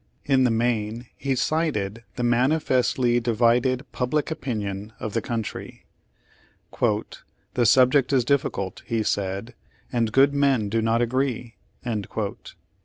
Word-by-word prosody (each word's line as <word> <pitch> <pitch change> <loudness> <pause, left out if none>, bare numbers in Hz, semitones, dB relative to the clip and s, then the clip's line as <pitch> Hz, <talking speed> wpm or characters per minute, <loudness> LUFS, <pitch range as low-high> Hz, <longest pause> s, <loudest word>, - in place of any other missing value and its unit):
In 135 -2 +3
the - - +4
main 115 0 -1
he 135 -1 -1
cited 120 -8 -1
the 125 - -3
manifestly 125 -1 +2
divided 120 +3 +2
public 145 +5 -1
opinion 105 -8 -4
of 110 - -5
the 115 - 0
country. 115 -2 -5 0.9
"The 120 - -2
subject 130 +3 +5
is 130 -4 +3
difficult," 125 -8 -1
he 115 -2 0
said, 100 +3 -2 0.4
"and 115 -2 +1
good 135 +4 +4
men 135 -7 +2
do 115 +2 +1
not 115 +1 +2
agree." 125 -1 -2
120 Hz, 115 wpm, -24 LUFS, 115-130 Hz, 0.9 s, subject